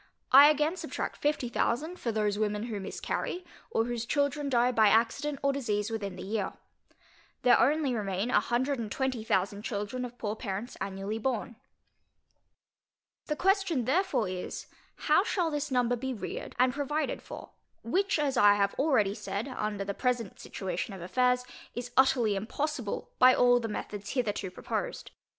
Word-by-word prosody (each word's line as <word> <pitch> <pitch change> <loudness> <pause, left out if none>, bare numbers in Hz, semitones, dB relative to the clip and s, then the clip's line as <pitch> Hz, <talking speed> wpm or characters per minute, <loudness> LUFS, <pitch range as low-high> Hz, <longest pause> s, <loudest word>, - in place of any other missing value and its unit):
I 280 +3 +10
again 305 +4 +1
subtract - - -4
fifty 295 -4 0
thousand, 305 +9 -1
for 235 - -1
those 210 -1 0
women 210 0 0
who 225 -3 -4
miscarry, 355 - -4 0.2
or 225 - +1
whose 240 -1 -3
children 285 +3 0
die 245 -1 +3
by 220 -3 +5
accident 235 +7 +2
or 275 0 +3
disease 215 -5 -1
within 200 -4 -3
the - - -7
year. 205 0 -2 0.9
There 250 - +6
only 290 -2 +3
remain 205 +1 -1
a - - +5
hundred 260 +3 0
and 215 -3 -4
twenty 265 -4 -1
thousand 200 -1 0
children 210 +3 -3
of 245 0 -7
poor 210 -2 -3
parents 215 +1 -5
annually 195 +3 -3
born. 235 0 -2 1.7
The 300 - -1
question 375 - +1
therefore 340 - +1
is, 185 0 -5 0.3
How 305 +3 +3 0.3
this 295 0 -2
number 245 -2 +2
shall 245 - -2
be 265 0 -3
reared 210 - -6
and 250 0 +3
provided 295 +2 -2
for? - - -10 0.3
which, 380 - +1
as 280 -4 0
I 205 -1 +7
have 200 -1 +1
already 260 -9 +3
said, 210 +3 -4
under 210 -5 -3
the 200 - -2
present 245 -3 -1
situation 190 +2 -4
of 190 - -9
affairs, 250 +6 +2 0.3
is 245 +1 -5
utterly 255 -5 +4
impossible 245 +3 -3
by 255 0 +8
all 245 0 +5
the 230 - -3
methods 205 -1 -5
hitherto 210 -6 -1
proposed. - - -4
240 Hz, 165 wpm, -29 LUFS, 210-275 Hz, 1.7 s, I